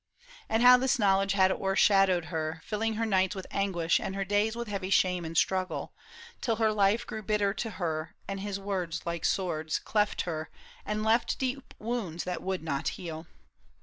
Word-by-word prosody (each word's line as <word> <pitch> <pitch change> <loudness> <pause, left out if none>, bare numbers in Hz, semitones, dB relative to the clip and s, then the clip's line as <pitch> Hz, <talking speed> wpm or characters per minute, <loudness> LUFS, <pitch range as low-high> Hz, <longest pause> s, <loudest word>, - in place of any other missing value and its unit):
And 225 +2 +2
how 250 0 +9
this 265 +1 +1
knowledge 195 -2 +3
had 190 -1 +4
o'ershadowed 195 -3 +3
her, 160 0 -2
Filling 220 +1 -1
her 225 +1 0
nights 190 -2 +2
with 190 - -6
anguish 175 -4 +1
and 190 - -4
her 195 0 -2
days 205 +3 +1
With 235 0 -4
heavy 195 -2 -3
shame 180 -2 +2
and 160 0 -4
struggle, 185 +1 0 0.5
till 230 -3 +1
her 220 -1 +2
life 205 +2 +2
Grew 220 - -6
bitter 205 -1 +1
to 225 +2 -3
her, 160 -6 -3
and 195 0 -4
his 200 0 -4
words 190 -4 -3
like 170 -1 -3
swords 160 -5 0
Cleft 210 -1 0
her 160 -2 -4 0.4
and 210 0 -1
left 225 +2 +2
deep 265 0 -4
wounds 215 -8 -3
that 180 0 -4
would 190 -2 -3
not 140 -4 -2
heal. 160 -2 -7
195 Hz, 180 wpm, -29 LUFS, 175-215 Hz, 0.5 s, how